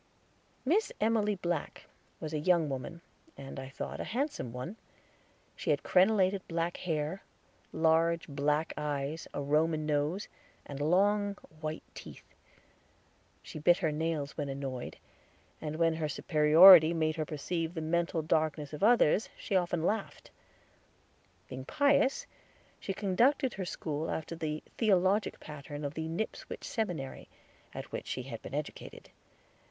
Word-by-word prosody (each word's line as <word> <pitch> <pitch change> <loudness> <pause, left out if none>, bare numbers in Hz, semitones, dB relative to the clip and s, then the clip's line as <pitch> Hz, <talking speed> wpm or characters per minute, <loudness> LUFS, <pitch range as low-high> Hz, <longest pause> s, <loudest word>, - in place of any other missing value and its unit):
Miss 380 +11 +2
Emily 215 -1 +2
Black 175 -4 -3 0.3
was 155 0 -5
a 155 - 0
young 170 -1 +2
woman, 135 +5 -5 0.4
and, 135 0 -8
I 130 0 -7
thought, 135 - -6
a - - -2
handsome 260 - -3
one. 125 - -6 0.8
She - - -5
had - - +2
crenelated 190 0 +3
black 165 +1 -2
hair, 160 +1 -2 0.5
large 165 +1 +2
black 150 +2 0
eyes, 150 +1 -3
a 145 - -4
Roman 155 +2 +1
nose, 150 +6 0 0.4
and 140 -1 -7
long 200 +6 +2 0.2
white 155 0 -4
teeth. - - -12 1.1
She - - -8
bit 175 +4 +5
her 160 -5 0
nails 150 -2 -2
when 145 -3 -3
annoyed, 135 -2 -5 0.6
and 155 -1 -4
when 165 0 +2
her 155 -2 -2
superiority 160 +3 +7
made 155 -1 0
her 155 - 0
perceive 165 +3 -3
the 160 - -3
mental 165 0 0
darkness 155 -1 0
of 150 - -6
others 215 -3 +4
she 200 - -3
often 175 -3 +1
laughed. 210 +3 -2 1.2
Being 130 +1 -7
pious, 285 - +2 0.5
she - - -4
conducted 235 +8 +2
her 190 - -4
school 155 -2 -4
after 160 +1 -4
the 155 -2 -4 0.2
theologic 200 -1 +2
pattern 145 0 -7
of 140 - -3
the 160 +1 -4
Nipswich 170 +7 -5
Seminary, 175 - -4 0.4
at - - -8
which - - -5
she 130 - -3
had 120 -3 -7
been 135 - -7
educated. 150 0 -7
160 Hz, 140 wpm, -31 LUFS, 150-190 Hz, 1.2 s, superiority